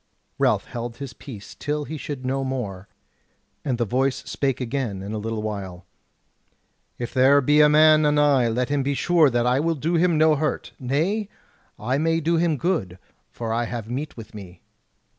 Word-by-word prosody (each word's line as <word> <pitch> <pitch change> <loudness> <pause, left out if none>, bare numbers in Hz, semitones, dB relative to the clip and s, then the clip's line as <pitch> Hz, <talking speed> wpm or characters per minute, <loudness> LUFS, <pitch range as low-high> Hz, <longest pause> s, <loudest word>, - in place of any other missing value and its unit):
Ralph - - +2
held 120 0 -6
his 140 -3 -7
peace 110 -8 -10
till 150 0 -3
he 160 - -6
should 140 -3 -6
know 135 +1 -1
more; 105 -8 -4 0.8
and 130 -4 -1
the 120 - 0
voice 130 +4 +1
spake 135 -3 -1
again 120 -6 -3
in 100 +2 -5
a 110 - -3
little 110 0 -3
while: 95 -4 -5 1.1
"If 120 - -5
there 135 +2 +5
be 150 +2 +4
a 150 - +6
man 155 +1 +6
anigh 145 -4 +3
let 125 +3 -1
him 145 -1 +1
be 140 +1 -1
sure 165 0 +4
that 120 -1 0
I 125 +2 +2
will 165 +2 0
do 165 +4 0
him 170 -1 +3
no 155 0 +5
hurt; 155 +1 -2
nay, 165 - -1 0.5
I 130 +6 -1
may 165 +1 +1
do 165 +1 +1
him 165 -2 +1
good, 125 - -1 0.3
for 115 -1 -4
I 120 +1 0
have 115 -1 -6
meat 140 +3 -4
with 110 -2 -10
me." 95 -4 -11
135 Hz, 185 wpm, -23 LUFS, 115-150 Hz, 1.1 s, a